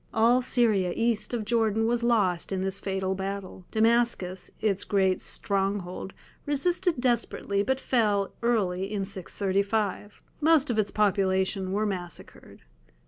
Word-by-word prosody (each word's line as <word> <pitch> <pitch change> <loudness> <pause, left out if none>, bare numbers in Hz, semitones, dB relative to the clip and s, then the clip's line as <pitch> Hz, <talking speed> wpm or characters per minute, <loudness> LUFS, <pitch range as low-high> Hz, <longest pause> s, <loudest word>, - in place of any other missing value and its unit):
All 235 +3 +4
Syria 215 -8 +2
east 230 -2 0
of 235 -3 -2
Jordan 225 -1 +1
was 240 +1 +1
lost 205 -8 +1
in 190 -1 -1
this 195 0 -2
fatal 190 -1 -2
battle. 190 -1 -6
Damascus, 225 -5 +1
its 200 -2 0
great 190 -2 +1
stronghold, 195 -2 -1 0.3
resisted 335 +2 +1
desperately 235 -5 0
but 265 +5 0
fell 210 -7 +1
early 195 -5 0
in 200 -2 -2
635. 200 +2 -2 0.2
Most 305 -3 +4
of 220 - 0
its 205 -1 +1
population 190 -2 +1
were 210 +2 0
massacred. 180 -4 -7
205 Hz, 130 wpm, -27 LUFS, 190-235 Hz, 0.3 s, All